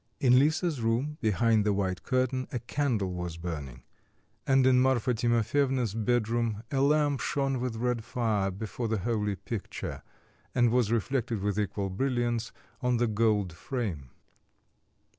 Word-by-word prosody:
In 125 Hz, -1 st, +5 dB
Lisa's 155 Hz, 0 st, +1 dB
room 125 Hz, +7 st, 0 dB
behind 110 Hz, +1 st, +3 dB
the 105 Hz, 0 st, +2 dB
white 95 Hz, -2 st, -1 dB
curtain 130 Hz, 0 st, 0 dB
a 125 Hz, -, -1 dB
candle 120 Hz, -6 st, -1 dB
was 90 Hz, -2 st, -4 dB
burning, 75 Hz, -8 st, -6 dB, 0.6 s
and 135 Hz, -1 st, +4 dB
in 130 Hz, -1 st, +5 dB
Marfa 130 Hz, -2 st, +2 dB
Timofyevna's 120 Hz, +1 st, +1 dB
bedroom 115 Hz, -1 st, 0 dB
a 135 Hz, -2 st, +1 dB
lamp 145 Hz, -1 st, +3 dB
shone 135 Hz, +1 st, -1 dB
with 125 Hz, -2 st, -2 dB
red 120 Hz, 0 st, -1 dB
fire 110 Hz, -5 st, 0 dB
before 110 Hz, +4 st, -4 dB
the 110 Hz, 0 st, 0 dB
holy 105 Hz, 0 st, -1 dB
picture, 105 Hz, +1 st, -6 dB, 0.5 s
and 120 Hz, -2 st, +4 dB
was 120 Hz, -3 st, +2 dB
reflected 115 Hz, -1 st, 0 dB
with 105 Hz, 0 st, 0 dB
equal 100 Hz, -1 st, -2 dB
brilliance 120 Hz, 0 st, -1 dB, 0.3 s
on 125 Hz, -1 st, +2 dB
the 120 Hz, -, +2 dB
gold 105 Hz, -4 st, +1 dB
frame. 90 Hz, -, -4 dB
115 Hz, 140 wpm, -29 LUFS, 105-130 Hz, 0.6 s, In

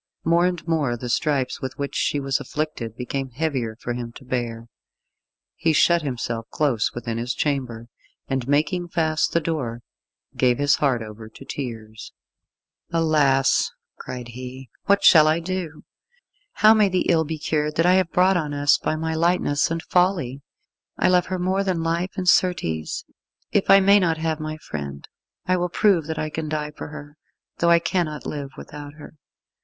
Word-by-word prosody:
More 170 Hz, +2 st, +3 dB
and 175 Hz, -2 st, -4 dB
more 145 Hz, -7 st, 0 dB
the 125 Hz, +1 st, -6 dB
stripes 135 Hz, +1 st, 0 dB
with 130 Hz, -, -5 dB
which 140 Hz, 0 st, -4 dB
she 145 Hz, -, 0 dB
was 135 Hz, -1 st, 0 dB
afflicted 150 Hz, -8 st, -4 dB
became 135 Hz, +2 st, -4 dB
heavier 130 Hz, -4 st, -2 dB
for 120 Hz, -, -3 dB
him 120 Hz, -1 st, -5 dB
to 130 Hz, -, -13 dB
bear. 120 Hz, -2 st, -3 dB, 0.9 s
He 160 Hz, -, +1 dB
shut 170 Hz, +2 st, +4 dB
himself 115 Hz, -5 st, -4 dB
close 135 Hz, -8 st, 0 dB
within 115 Hz, -1 st, -4 dB
his 120 Hz, +1 st, -2 dB
chamber, 125 Hz, -6 st, -2 dB, 0.4 s
and 135 Hz, -2 st, -2 dB
making 160 Hz, +5 st, +1 dB
fast 160 Hz, -2 st, 0 dB
the 170 Hz, -, +2 dB
door, 130 Hz, -8 st, -3 dB, 0.5 s
gave 125 Hz, -2 st, +2 dB
his 145 Hz, 0 st, +3 dB
heart 130 Hz, -6 st, +1 dB
over 110 Hz, 0 st, -10 dB
to 135 Hz, -, -14 dB
tears. 110 Hz, -6 st, -7 dB, 0.8 s
"Alas," 150 Hz, -5 st, +3 dB, 0.3 s
cried 125 Hz, -2 st, -7 dB
he, 125 Hz, +1 st, -9 dB
"what 200 Hz, 0 st, +3 dB
shall 155 Hz, -2 st, +8 dB
I 155 Hz, +2 st, +3 dB
do! 170 Hz, -3 st, -5 dB, 0.7 s
How 215 Hz, +1 st, +6 dB
may 210 Hz, -2 st, +4 dB
the 185 Hz, 0 st, 0 dB
ill 165 Hz, -2 st, +3 dB
be 160 Hz, +1 st, -4 dB
cured 150 Hz, 0 st, -1 dB
that 165 Hz, -, +2 dB
I 180 Hz, -, +5 dB
have 185 Hz, -2 st, +2 dB
brought 185 Hz, +2 st, +4 dB
on 150 Hz, -4 st, -2 dB
us 145 Hz, 0 st, +3 dB
by -, -, -1 dB
my 160 Hz, +1 st, -2 dB
lightness 165 Hz, -3 st, +1 dB
and 165 Hz, 0 st, -3 dB
folly! 175 Hz, -8 st, +1 dB, 0.6 s
I -, -, +3 dB
love 180 Hz, -1 st, +3 dB
her 185 Hz, -, -2 dB
more 185 Hz, +2 st, 0 dB
than 180 Hz, -4 st, -1 dB
life, 170 Hz, +3 st, -1 dB
and, 185 Hz, -1 st, -3 dB
certes, 170 Hz, -, +1 dB, 0.5 s
if 200 Hz, -, +1 dB
I 195 Hz, -, +9 dB
may 200 Hz, +1 st, +6 dB
not 165 Hz, -4 st, +1 dB
have 160 Hz, -1 st, -2 dB
my 155 Hz, 0 st, -5 dB
friend 70 Hz, -, -7 dB, 0.4 s
I 185 Hz, 0 st, +2 dB
will 180 Hz, 0 st, -1 dB
prove 175 Hz, -4 st, +2 dB
that 160 Hz, -1 st, -4 dB
I 155 Hz, 0 st, -3 dB
can 155 Hz, 0 st, -4 dB
die 150 Hz, -1 st, -3 dB
for -, -, -8 dB
her, 145 Hz, 0 st, -10 dB, 0.4 s
though 170 Hz, -, +3 dB
I 170 Hz, -, +7 dB
cannot 165 Hz, -3 st, -2 dB
live 145 Hz, -2 st, -4 dB
without 145 Hz, -1 st, -9 dB
her." 150 Hz, -, -12 dB
150 Hz, 180 wpm, -23 LUFS, 130-170 Hz, 0.9 s, I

